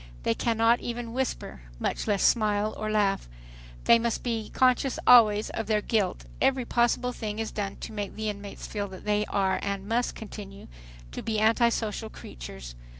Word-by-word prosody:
They - - +2
cannot 230 - +2
even 235 -1 -5
whisper, 260 - -3 0.2
much - - -2
less 205 -2 +1
smile 215 -2 +2
or 215 - -3
laugh. 200 - +1 0.5
They 235 - +6
must 235 0 -1
be 225 -3 -2
conscious 255 +1 +2
always 215 -4 +6
of 225 - -4
their 210 -1 +1
"guilt." 205 -5 0 0.2
Every 265 -2 +2
possible 240 +1 +1
thing 215 -3 -4
is 225 0 -3
done 200 -2 -3
to - - -6
make 205 -2 -4
the 220 0 -3
inmates 200 -1 -6
feel 205 -1 -3
that 190 -1 -11
they 210 0 +1
are 190 -1 +1
and 200 -1 -3
must 235 +2 0
continue 200 -2 -9 0.4
to - - -5
be 220 -1 -1
antisocial 225 -1 +1
creatures. - - -9
215 Hz, 170 wpm, -27 LUFS, 205-235 Hz, 0.5 s, They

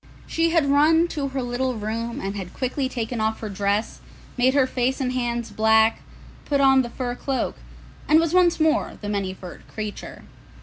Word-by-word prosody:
She 330 0 +1
had 330 -3 +2
run 310 +4 +4
to 290 -4 -3
her 265 -1 -3
little 245 +1 -1
room 225 +2 -4
and 195 +1 -4
had 185 -3 -7
quickly 260 +1 -2
taken 235 -2 -3
off 220 0 0
her 215 - -5
dress, 200 +2 -1 0.4
made 255 +2 +2
her 275 -2 +5
face 255 0 -1
and 255 -2 -1
hands 240 -2 -2
black, 220 +1 +3 0.4
put 285 -1 0
on 270 -1 +5
the 240 - -4
fur 245 0 -4
cloak, 265 +1 -3 0.5
and 310 - +6
was 330 0 0
once 355 -2 +4
more 315 0 +1
the 205 - -5
Many 200 -2 -1
furred 180 -2 -11
Creature. 215 -1 -7
250 Hz, 185 wpm, -23 LUFS, 220-280 Hz, 0.5 s, and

